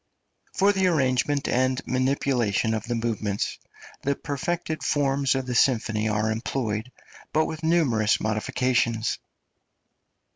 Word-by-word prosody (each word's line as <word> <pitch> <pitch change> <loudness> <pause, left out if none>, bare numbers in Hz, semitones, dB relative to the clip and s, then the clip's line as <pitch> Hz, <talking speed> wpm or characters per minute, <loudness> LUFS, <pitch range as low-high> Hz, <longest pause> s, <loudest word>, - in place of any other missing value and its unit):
For 200 +1 +4
the 190 -1 +2
arrangement 140 -3 +1
and 130 +1 +1
manipulation 130 -4 +1
of 110 0 -3
the 120 0 -2
movements 110 -3 -2 0.4
the 140 0 0
perfected 155 +4 -3
forms 140 -2 +1
of 135 -1 -1
the 125 - -3
symphony 110 -3 +2
are 105 +1 0
employed, 110 0 -2 0.4
but 155 +1 +2
with 160 -1 -5
numerous 135 -11 +2
modifications. 115 +1 0
130 Hz, 115 wpm, -25 LUFS, 110-140 Hz, 0.4 s, For